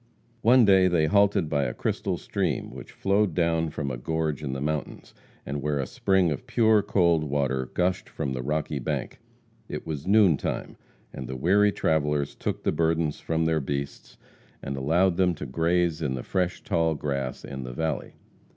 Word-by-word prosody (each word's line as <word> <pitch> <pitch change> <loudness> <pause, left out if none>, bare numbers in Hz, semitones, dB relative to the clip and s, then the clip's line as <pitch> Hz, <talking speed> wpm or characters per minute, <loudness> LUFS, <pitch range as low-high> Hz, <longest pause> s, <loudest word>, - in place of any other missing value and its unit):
One 120 +1 +6
day 95 -2 +5
they 85 -3 +2
halted 100 +1 +3
by 70 -2 0
a - - -3
crystal - - -2
stream - - -2
which - - -10
flowed 100 -3 +1
down 80 -2 +1
from 70 -3 -4
a 60 - -4
gorge 80 +3 -2
in 70 -3 -3
the 65 - -3
mountains, 75 +1 -4 0.3
and 70 0 -4
where 75 0 -1
a 70 - -1
spring 95 +5 +1
of 75 - -5
pure, 110 -2 +4
cold 85 -5 +2
water 70 -3 -1
gushed 90 0 0
from 65 - -3
the 65 - -3
rocky 75 +1 -2
bank. 60 - -4 0.5
It - - -5
was 75 0 -5
noon 100 -6 +5
time, - - -4 0.4
and 65 -1 -6
the 65 - -5
weary 100 +9 +4
travellers 75 -5 0
took - - -4
the - - +1
burdens 80 -2 0
from 80 0 -1
their 80 -1 +2
beasts, 70 +1 -5 0.5
and 70 - -4
allowed 85 +7 +2
them 90 -2 +2
to 75 - -6
graze 85 +3 0
in 70 -4 -1
the 65 - -5
fresh, 90 -2 -1
tall 80 -1 +1
grass 70 -3 -3
in 65 -1 -6
the 60 - -6
valley. 80 +4 -3
80 Hz, 185 wpm, -26 LUFS, 70-90 Hz, 0.5 s, One